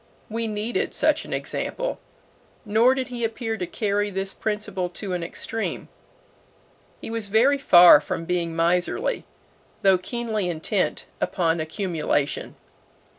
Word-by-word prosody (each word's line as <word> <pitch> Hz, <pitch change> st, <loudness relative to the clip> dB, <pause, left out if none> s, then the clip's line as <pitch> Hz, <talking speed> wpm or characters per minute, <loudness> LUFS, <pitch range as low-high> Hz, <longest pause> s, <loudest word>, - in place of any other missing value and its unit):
We 230 Hz, +1 st, -1 dB
needed 215 Hz, +2 st, -2 dB
such -, -, +2 dB
an -, -, -10 dB
example. -, -, -3 dB, 0.7 s
Nor 225 Hz, +5 st, +4 dB
did 265 Hz, 0 st, -3 dB
he 240 Hz, -1 st, -4 dB
appear 225 Hz, 0 st, -2 dB
to 180 Hz, -5 st, -4 dB
carry 205 Hz, 0 st, -1 dB
this 195 Hz, 0 st, -3 dB
principle 210 Hz, -4 st, -3 dB
to 185 Hz, +2 st, -5 dB
an 180 Hz, -, -2 dB
extreme. 220 Hz, +6 st, -4 dB, 1.1 s
He -, -, -6 dB
was 225 Hz, -2 st, -3 dB
very 245 Hz, +7 st, +3 dB
far 175 Hz, -, +8 dB
from 165 Hz, -, -4 dB
being 170 Hz, -1 st, -1 dB
miserly, 180 Hz, -, 0 dB, 0.6 s
though 190 Hz, -2 st, +5 dB
keenly 220 Hz, -1 st, -2 dB
intent 175 Hz, +4 st, -1 dB, 0.2 s
upon 165 Hz, -2 st, +1 dB
accumulation. 160 Hz, -3 st, -2 dB
205 Hz, 125 wpm, -24 LUFS, 175-225 Hz, 1.1 s, far